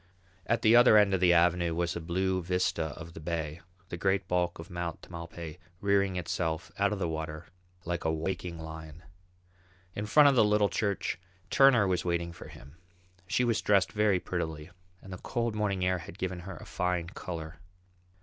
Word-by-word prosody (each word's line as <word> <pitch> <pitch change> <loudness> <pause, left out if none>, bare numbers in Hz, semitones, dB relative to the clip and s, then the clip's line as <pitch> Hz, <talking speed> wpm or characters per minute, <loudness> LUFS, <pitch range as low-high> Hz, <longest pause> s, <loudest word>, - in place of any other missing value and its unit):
At 115 - +1
the 110 +1 +6
other 120 -3 +8
end 100 -2 +5
of 95 - +2
the 90 -1 +5
avenue 85 -1 +3
was 85 0 -1
a 85 - -4
blue 95 +3 0
vista 90 -2 0
of 85 +1 -9
the - - -9
bay, 80 -1 -4 0.3
the 85 - -5
great 95 +1 0
bulk 90 -1 0
of 80 - -10
Mount 85 -1 -4
Tamalpais 85 -1 -8 0.2
rearing 100 -1 +2
itself 85 -1 -2
out 100 +1 +3
of 105 - -1
the 90 -3 -1
water 80 0 -5 0.4
like 85 0 -2
a 80 - +1
waking 85 +1 -3
lion. 80 0 -9 0.9
In 105 +3 -4
front 150 +6 +7
of 140 - +5
the 125 - +5
little 105 -1 +3
church 100 -4 -1 0.3
Turner 135 -6 +6
was 90 -2 0
waiting 85 -1 -1
for 85 - -11
him. 70 +5 -14 0.5
She 125 - +1
was 115 -3 +1
dressed 100 -2 +3
very 105 -3 +2
prettily 80 -3 -4 0.3
and 95 - -9
the 90 - -7
cold 120 -2 -2
morning 100 -3 0
air 90 0 +1
had 90 +2 -10
given 90 -2 -3
her 90 0 -8
a - - -11
fine 90 -1 -1
colour. 80 -4 -7
90 Hz, 190 wpm, -30 LUFS, 85-100 Hz, 0.9 s, other